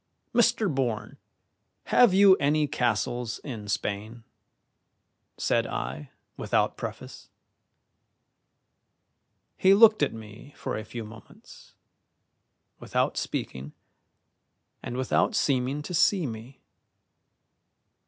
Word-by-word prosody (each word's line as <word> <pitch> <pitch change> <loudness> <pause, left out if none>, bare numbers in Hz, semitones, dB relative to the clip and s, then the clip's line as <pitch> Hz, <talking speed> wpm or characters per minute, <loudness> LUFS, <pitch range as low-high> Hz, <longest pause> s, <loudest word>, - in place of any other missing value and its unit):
"Mr. 230 -2 +3
Bourne, 130 - -2 0.7
have 245 -5 +4
you 195 0 +7
any 150 +1 +1
castles 120 -1 -1
in 110 -7 -7
Spain?" 105 +3 -4 1.1
said - - 0
I, 65 +4 -5 0.3
without - - 0
preface. - - -8 2.3
He 190 +1 +5
looked 215 0 +6
at - - +2
me 110 +5 -12
for - - -4
a 110 - -5
few 115 +2 -7
moments, 110 0 -15 1.0
without - - -1
speaking 65 +3 -5 1.1
and 120 - -6
without 130 -1 +1
seeming 135 +1 0
to 180 - -7
see 180 +1 +3
me. 115 +2 -8
125 Hz, 95 wpm, -27 LUFS, 110-165 Hz, 2.3 s, you